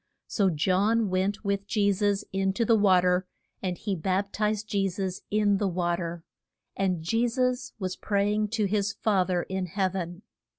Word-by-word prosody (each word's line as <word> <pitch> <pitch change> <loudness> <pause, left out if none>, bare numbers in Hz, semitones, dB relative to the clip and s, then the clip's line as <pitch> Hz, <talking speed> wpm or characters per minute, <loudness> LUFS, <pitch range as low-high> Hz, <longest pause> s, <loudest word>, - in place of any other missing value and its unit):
So 200 -3 +1
John 195 +6 +2
went 195 +3 -1
with 200 0 -1
Je 205 -2 +2
sus 205 0 0
in 195 0 +1
to 230 +4 0
the 230 - +5
wa 195 -4 +5
ter, 180 0 +1 0.3
and 180 -2 -2
he 205 -3 -2
bap 190 +4 -1
tized 215 0 0
Je 200 -2 0
sus 185 0 -4
in 205 -1 +2
the 200 - 0
wa 175 -1 0
ter. 170 -1 -5 0.5
And 185 -4 0
Je 230 +8 +1
sus 250 +1 -1
was 185 -3 -4
pray 205 0 +1
ing 215 0 +1
to 215 0 0
his 200 0 0
Fa 200 -3 +2
ther 180 -2 0
in 190 -1 -3
heav 190 +1 -1
en. 175 +1 -5
195 Hz, 195 wpm, -27 LUFS, 185-210 Hz, 0.5 s, the